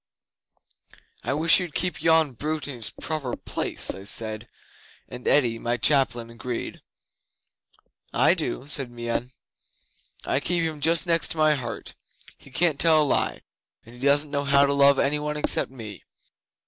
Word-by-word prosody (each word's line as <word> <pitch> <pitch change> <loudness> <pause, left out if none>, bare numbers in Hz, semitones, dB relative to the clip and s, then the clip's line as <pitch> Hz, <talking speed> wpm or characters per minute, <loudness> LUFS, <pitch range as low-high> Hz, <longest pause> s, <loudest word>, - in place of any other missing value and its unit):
'"I 120 - -1
wish 165 +4 +4
you'd 175 -4 -6
keep 180 0 -2
yon 160 -3 +3
brute 150 +5 -3
in 140 - -6
its 115 -3 -1
proper 150 -6 -3
place," - - -2
I 95 - -7
said, 110 +2 -2 0.6
and 125 - -9
Eddi, 120 -5 +3
my 120 +1 -1
chaplain, 120 -4 +1
agreed. 115 +1 -6 1.3
'"I - - +4
do," 135 - -4
said 140 -3 +1
Meon. 120 +1 -4 0.9
"I 135 - +1
keep 170 +3 -1
him 155 -2 -3
just 165 +3 +3
next 165 -3 +1
my 155 -1 +4
heart. 120 -6 -5 0.4
He - - -18
can't 155 +2 +1
tell 160 -2 +5
a - - 0
lie, 140 - 0 0.4
and 115 - -15
he 120 - -14
doesn't 145 +2 +2
know 140 -1 -1
how 140 0 +4
to 140 - 0
love 140 0 +5
any 145 +2 +1
one 150 0 -3
except 150 - 0
me. 110 -6 -10
140 Hz, 160 wpm, -25 LUFS, 120-155 Hz, 1.3 s, tell